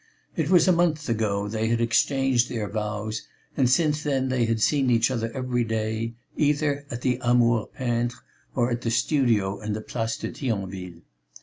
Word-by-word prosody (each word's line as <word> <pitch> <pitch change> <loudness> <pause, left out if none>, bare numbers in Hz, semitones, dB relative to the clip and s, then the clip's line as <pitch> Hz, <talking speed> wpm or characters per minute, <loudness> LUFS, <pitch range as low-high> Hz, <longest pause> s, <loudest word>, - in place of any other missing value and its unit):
It 160 -2 -1
was 180 -1 +5
a - - +6
month 165 -3 +1
ago 105 -3 0
they 110 +1 -1
had 115 0 +1
exchanged 125 +2 +2
their 110 -3 -3
vows 105 +1 -4 0.3
and 130 -4 +3
since 150 +2 +2
then 135 -3 0
they 125 -2 +1
had 115 0 0
seen 135 +3 +2
each 120 +1 +3
other 115 -2 -2
every 125 -2 0
day, 110 +1 -2 0.2
either 145 -1 +1
at 120 0 -5
the 125 -1 +1
Amour 120 -2 +3
peintre 120 -1 -2 0.4
or 125 -1 +1
at 120 0 -2
the 115 - -1
studio 115 -6 +1
in 105 0 -3
the 110 - -3
Place 115 0 -3
de - - -5
Thionville. 95 - -4
120 Hz, 180 wpm, -25 LUFS, 110-135 Hz, 0.4 s, a